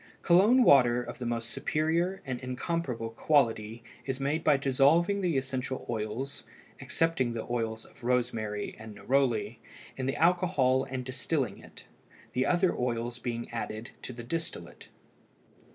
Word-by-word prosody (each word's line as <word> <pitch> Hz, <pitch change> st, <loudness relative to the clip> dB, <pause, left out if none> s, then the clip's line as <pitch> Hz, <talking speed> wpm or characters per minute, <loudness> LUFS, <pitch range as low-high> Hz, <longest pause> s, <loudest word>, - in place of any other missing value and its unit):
Cologne 205 Hz, +9 st, +6 dB
water 125 Hz, -, +5 dB
of -, -, -8 dB
the 125 Hz, -, -3 dB
most 115 Hz, 0 st, -3 dB
superior 170 Hz, +5 st, 0 dB
and 130 Hz, -2 st, -3 dB
incomparable 125 Hz, -2 st, -3 dB
quality 115 Hz, -4 st, +1 dB, 0.2 s
is 135 Hz, -1 st, -3 dB
made 145 Hz, +4 st, -1 dB
by 150 Hz, -2 st, +5 dB
dissolving 140 Hz, +9 st, +3 dB
the 175 Hz, -6 st, +1 dB
essential 130 Hz, 0 st, -3 dB
oils, 115 Hz, +4 st, -3 dB, 0.4 s
excepting 165 Hz, -8 st, 0 dB
the 115 Hz, -, -4 dB
oils 115 Hz, -2 st, -2 dB
of -, -, -20 dB
rosemary 115 Hz, -4 st, -1 dB
and 110 Hz, -1 st, -9 dB
neroli, 120 Hz, -5 st, 0 dB, 0.4 s
in 130 Hz, -1 st, -2 dB
the 135 Hz, -, 0 dB
alcohol 165 Hz, -7 st, +3 dB
and 130 Hz, -1 st, -5 dB
distilling 130 Hz, -3 st, -2 dB
it, -, -, -14 dB, 0.5 s
the 130 Hz, +1 st, +1 dB
other 180 Hz, 0 st, +2 dB
oils 120 Hz, 0 st, -2 dB
being 120 Hz, -2 st, -4 dB
added 115 Hz, -1 st, -5 dB
to -, -, -6 dB
the 120 Hz, -1 st, -8 dB
distillate. 145 Hz, -, -5 dB
130 Hz, 140 wpm, -29 LUFS, 115-155 Hz, 0.5 s, Cologne